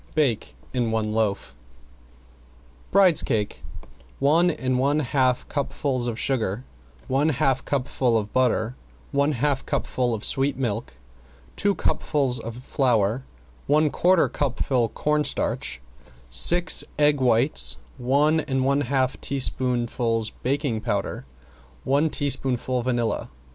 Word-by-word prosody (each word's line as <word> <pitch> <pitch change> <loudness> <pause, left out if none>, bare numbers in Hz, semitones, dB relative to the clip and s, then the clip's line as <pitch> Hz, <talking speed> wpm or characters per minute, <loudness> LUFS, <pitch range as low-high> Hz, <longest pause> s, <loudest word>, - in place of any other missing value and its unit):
Bake 135 -8 0 0.2
in 120 -3 0
one 110 -1 -1
loaf. 110 -3 -1 1.4
~BRIDE'S 185 -5 +5
CAKE 105 -2 -2 0.6
~One 160 +6 +3
and 130 -5 -1
one 140 +3 +2
half 130 -2 0
cupfuls 135 -3 -2
of 115 -2 -3
sugar, 115 -4 -1 0.4
one 140 +4 +2
half 135 -2 +1
cupful 125 -3 0
of 105 -1 -4
butter, 125 -2 +1 0.4
one 140 +2 +1
half 140 +1 0
cupful 125 -2 -1
of 105 - -5
sweet 135 +1 +1
milk, 115 - -3 0.6
two 200 -1 +1
cupfuls 135 -5 0
of 115 +2 -8
flour, 120 -3 +1 0.4
one 150 +1 +3
quarter 180 -1 +3
cupful 130 -3 -1
cornstarch, 150 - -1 0.5
six 175 - +4
egg 145 -1 +3
whites, 125 +3 +3 0.2
one 145 +6 +2
and 135 -4 -1
one 140 +1 +2
half 130 -1 -1
teaspoonfuls 120 -4 -1
baking 135 -4 -2
powder, - - -3 0.6
one 140 +4 +2
teaspoonful 130 -3 0
vanilla. 120 -3 -1
130 Hz, 115 wpm, -24 LUFS, 120-145 Hz, 1.4 s, ~BRIDE'S